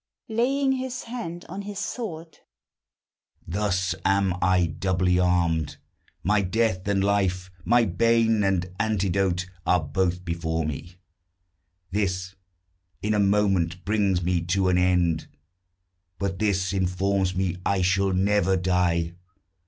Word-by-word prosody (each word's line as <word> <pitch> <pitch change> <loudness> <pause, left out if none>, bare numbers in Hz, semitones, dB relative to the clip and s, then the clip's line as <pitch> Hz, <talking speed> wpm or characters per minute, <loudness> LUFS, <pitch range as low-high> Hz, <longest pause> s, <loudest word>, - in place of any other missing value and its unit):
(Laying 265 +5 +1
his 260 -1 -3
hand 200 -8 -6
on 190 +4 -6
his 200 0 -7
sword.) 170 -9 -5 1.1
Thus 95 0 0
am 95 -1 +2
I 90 -1 +3
doubly 90 +1 0
armed: 85 -4 +1 0.5
my 105 +1 +3
death 95 -1 0
and 100 -1 +1
life, 95 -2 0
My 120 +1 +4
bane 115 +2 +2
and 95 -2 +1
antidote, 95 -4 0 0.2
are 90 0 +3
both 90 +4 -1
before 80 -1 -2
me: 80 +4 -6 1.0
This 95 -2 -1 0.7
in 105 +1 +1
a 105 - +1
moment 95 -4 +1
brings 100 -4 +1
me 90 0 +1
to 95 +2 +1
an 90 0 +3
end; 90 -3 +2 0.9
But 95 -2 -3
this 95 -3 0
informs 95 0 0
me 90 -2 -1
I 95 -2 +1
shall 95 +1 +2
never 95 0 +2
die. 90 -2 +1
95 Hz, 120 wpm, -25 LUFS, 90-105 Hz, 1.1 s, My